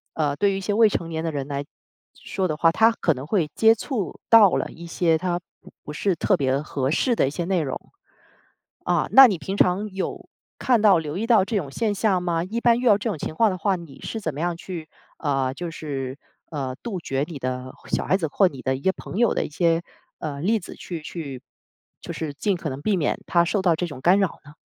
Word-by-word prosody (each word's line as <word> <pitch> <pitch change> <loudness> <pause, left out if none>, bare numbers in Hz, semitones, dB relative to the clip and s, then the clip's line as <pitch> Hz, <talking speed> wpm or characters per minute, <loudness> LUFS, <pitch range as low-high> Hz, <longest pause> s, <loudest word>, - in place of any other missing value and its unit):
呃， 145 -3 0
对 200 +5 +2
于 195 - -2
一 - - -4
些 205 +2 -1
未 220 0 +5
成 170 -4 -3
年 160 0 -3
的 165 - -1
人 140 -3 -4
来 140 -1 -3 0.5
说 190 -1 -3
的 155 - -2
话， 165 +1 +4
他 225 +6 +4
可 175 -7 +1
能 135 +1 -8
会 165 -5 0
接触 225 - +1
到 220 -4 +8
了 - - -1
一 170 +1 -10
些， 165 -1 +2
他 175 -1 -1 0.2
不 - - -15
不 150 - -7
是 190 +4 0
特 190 +4 +2
别 135 -3 +1
合 140 -3 -2
适 235 - +1
的 135 - +2
一 - - 0
些 170 +4 -3
内 180 -2 +1
容。 135 - -3 1.1
啊， - - +1
那 270 0 +10
你 195 -7 -1
平 190 +6 -5
常 195 +4 +2
有， 190 0 -5 0.3
看 245 -4 +3
到、 200 -5 +6
留 155 +1 -5
意 225 +3 -2
到 225 -5 +5
这 220 -1 -1
种 145 -7 -3
现 215 +2 0
象 190 -3 +1
吗？ 170 -1 0
一 230 +5 -3
般 235 -1 +4
遇 250 - -3
到 205 -2 +6
这 225 +2 -3
种 195 - -3
情 155 - -5
况 220 +1 +3
的 185 - -4
话， 195 +2 +1
你 165 -6 -10
是 225 - -5
怎 160 -6 -3
么 145 - -7
样 175 +1 -1
去， 170 -3 -7 0.3
呃， 135 -4 0
就 170 +4 -5
是， 135 -4 -5 0.3
呃， 135 -4 -3
杜 220 -6 -3
绝 135 -2 -1
你 165 -4 -7
的 130 0 -4 0.2
小 - - 0
孩 - - +2
子， 170 -5 -2
或 190 +5 +4
你 135 -6 -8
的 130 0 0
一 135 - -12
些 190 - +2
朋 - - -8
友 235 -1 +3
的 - - -1
一 - - -7
些， 165 +1 +1 0.4
呃， 145 -3 -5
例 220 +7 +2
子 175 - -10
去 170 -3 -7
去， 145 -5 -7 0.6
就 - - -6
是 155 -3 -4
尽 195 +6 0
可 170 -4 -4
能 135 +2 -6
避 210 +2 +1
免 150 - 0
他 170 -1 +4
受 195 +3 0
到 175 -3 +3
这 175 - -2
种 145 - -9
干 180 +7 +5
扰 195 - -1
呢？ 145 - -13
170 Hz, 265 characters per minute, -24 LUFS, 150-200 Hz, 1.1 s, 那